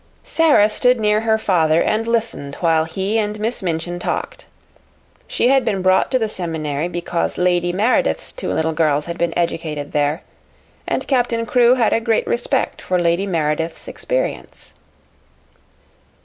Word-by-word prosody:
Sara 310 -10 +4
stood 250 +3 +2
near 210 0 +2
her 220 -1 +2
father 165 -7 +2
and 220 +5 0
listened 225 -12 -2
while 165 -2 +1
he 195 +6 -1
and 210 0 -2
Miss 225 +3 -2
Minchin 175 0 -3
talked. - - -4 0.8
She 245 - +1
had 270 -1 +4
been 200 -5 -1
brought 185 0 +3
to 260 - +2
the 225 -3 -1
seminary 160 -5 -3
because 175 -1 -3
Lady 175 -1 +1
Meredith's 225 - 0
two - - -4
little 160 0 0
girls 150 -2 +1
had 170 0 -6
been 170 -1 +1
educated 160 -4 -2
there, 150 +2 0 0.6
and - - -2
Captain 245 -3 +1
Crewe 240 +2 +4
had 235 -4 +2
a 230 - +1
great 225 -1 +1
respect 240 - -1
for 185 - -1
Lady 175 +3 +1
Meredith's 160 -2 -2
experience. - - -4
185 Hz, 150 wpm, -19 LUFS, 165-225 Hz, 0.8 s, Sara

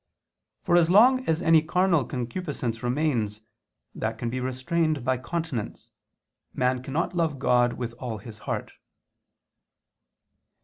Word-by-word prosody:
For 175 - +3
as 170 -1 +4
long 250 +7 +6
as 160 +2 +1
any 165 -1 +6
carnal 170 -2 +2
concupiscence 125 -3 -4
remains, 120 -5 0 0.5
that 110 0 -3
can 115 0 -3
be 130 - -2
restrained 135 +3 -1
by 130 -1 +1
continence, 160 -5 -4 0.6
man 125 0 +1
cannot 155 +7 -2
love 165 -4 0
God 120 -2 +3
with 120 -2 -5
all 120 -4 -4
his 105 +1 -11
heart. - - -3
130 Hz, 125 wpm, -26 LUFS, 120-165 Hz, 0.6 s, long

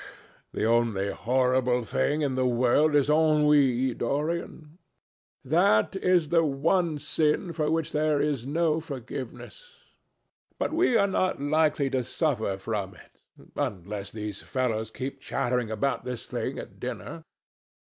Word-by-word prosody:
"The - - -2
only 115 -4 +1
horrible 125 0 +1
thing 150 +6 0
in 140 -2 0
the 130 0 +1
world 125 +5 +3
is 145 -2 +4
ennui, 150 -5 +3
Dorian. 155 +5 -3 0.7
That 155 - +3
is 180 -5 +2
the 165 0 +4
one 160 +3 +1
sin 155 +4 0
for 155 -2 -1
which 160 -1 -1
there 150 -1 +1
is 145 -5 0
no 155 +3 +1
forgiveness. 155 - -8 0.8
But - - -2
we 320 -8 +3
are 200 - +4
not 185 -3 0
likely 145 -1 +1
to 130 -1 0
suffer 115 - -1
from 100 -1 -4
it - - -19 0.3
unless 100 +1 -4
these 105 -2 -6
fellows 115 -4 -2
keep 135 +4 -6
chattering 125 -4 -1
about 110 +6 -1
this 125 -2 -5
thing - - -4
at - - -9
dinner. - - -6
140 Hz, 135 wpm, -27 LUFS, 120-155 Hz, 0.8 s, is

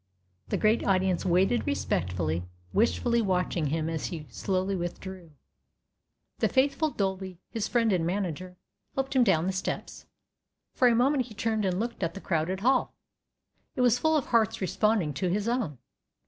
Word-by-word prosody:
The - - -1
great 215 +1 +2
audience 185 -2 +1
waited 190 +9 +2
respectfully, 90 - -1 0.3
wistfully 235 +2 +2
watching 180 -5 0
him 155 +2 -1
as 160 -1 -2
he 160 -3 -6
slowly 190 0 -1
withdrew. 175 -1 -6 1.1
The - - +2
faithful 275 +4 +2
Dolby, 190 - -3
his 220 -2 -2
friend 230 -4 +2
and 175 -3 +1
manager, 180 0 -3 0.4
helped 270 0 -2
him 255 - +6
down 175 -7 +3
the 190 - 0
steps. 190 - -4 0.7
For 255 - +4
a 235 - +4
moment 255 +2 +2
he 220 - -12
turned 220 -1 0
and 185 -1 0
looked 235 0 -3
at 170 -1 -1
the - - -5
crowded 185 +1 -1
hall. 255 +3 +2 0.8
It - - 0
was 245 -1 +4
full 315 +3 +3
of 280 - -1
hearts 225 -4 +2
responding 195 -3 +1
to 180 +6 -1
his 205 +4 -1
own. 235 - -1
195 Hz, 160 wpm, -28 LUFS, 175-235 Hz, 1.1 s, him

